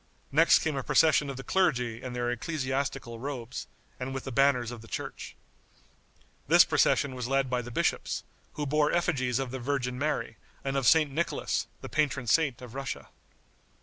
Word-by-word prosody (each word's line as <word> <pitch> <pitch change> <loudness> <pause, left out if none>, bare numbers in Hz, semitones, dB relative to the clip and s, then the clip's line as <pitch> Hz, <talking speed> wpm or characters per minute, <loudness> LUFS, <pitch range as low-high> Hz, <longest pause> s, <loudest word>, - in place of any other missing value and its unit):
Next 160 +4 +6
came 160 -2 -1
a 135 - -1
procession 150 +1 +3
of 135 - -5
the 135 - -6
clergy 125 -12 +1
in 130 -1 -6
their 120 0 -1
ecclesiastical 130 -3 -3
robes, 130 -2 -5 0.3
and 130 +1 -4
with 135 - -4
the 135 - -6
banners 125 -2 +3
of 120 -2 -8
the 115 - -13
church. - - -6 1.1
This - - +7
procession 140 -2 +2
was 125 -2 -4
led 135 -1 +1
by 125 -1 +1
the 120 - -8
bishops, 120 - -1 0.3
who 150 - -3
bore 150 +1 +2
effigies 135 -8 +1
of 135 -2 -2
the 130 - -4
Virgin 125 -1 -2
Mary 145 -6 -2 0.3
and 135 0 -2
of 135 -3 +1
St. 155 -1 +5
Nicholas, 165 +5 -1
the - - -6
patron 140 -4 0
saint 135 -1 +2
of 120 -2 -10
Russia. 135 0 -5
135 Hz, 180 wpm, -29 LUFS, 125-145 Hz, 1.1 s, This